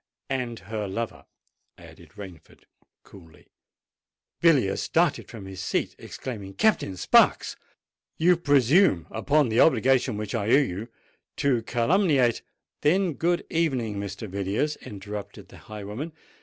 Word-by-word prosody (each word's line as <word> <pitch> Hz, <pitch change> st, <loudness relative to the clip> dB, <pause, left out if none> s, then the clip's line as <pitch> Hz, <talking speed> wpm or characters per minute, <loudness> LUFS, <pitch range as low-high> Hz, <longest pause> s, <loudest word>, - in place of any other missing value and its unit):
"And 125 Hz, -3 st, -2 dB
her 105 Hz, +1 st, -4 dB
lover," 115 Hz, +4 st, -5 dB, 0.5 s
added -, -, -15 dB
Rainford 90 Hz, -7 st, -12 dB, 0.4 s
coolly. 85 Hz, -6 st, -17 dB, 1.0 s
Villiers 135 Hz, -, +3 dB
started -, -, 0 dB
from 110 Hz, -5 st, -9 dB
his 95 Hz, -1 st, -8 dB
seat, -, -, -2 dB
exclaiming, 100 Hz, -7 st, -7 dB
"Captain 195 Hz, -, +1 dB
Sparks! -, -, +3 dB, 0.6 s
you 175 Hz, +2 st, +4 dB
presume 145 Hz, -, +3 dB
upon 140 Hz, +5 st, +1 dB
the 110 Hz, -, +1 dB
obligation 130 Hz, -4 st, +3 dB
which 105 Hz, -1 st, -5 dB
I 105 Hz, -3 st, -1 dB
owe 115 Hz, -, +5 dB
you, 110 Hz, 0 st, -5 dB, 0.5 s
to 130 Hz, -4 st, +1 dB
calumniate——" 130 Hz, -, +2 dB, 0.4 s
"Then 175 Hz, +3 st, +2 dB
good 175 Hz, +4 st, 0 dB
evening, 130 Hz, -11 st, 0 dB
Mr. 100 Hz, +2 st, -5 dB
Villiers," 100 Hz, +10 st, -2 dB
interrupted 105 Hz, 0 st, -8 dB
the -, -, -14 dB
highwayman. 110 Hz, +9 st, -6 dB
115 Hz, 120 wpm, -26 LUFS, 100-145 Hz, 1.0 s, owe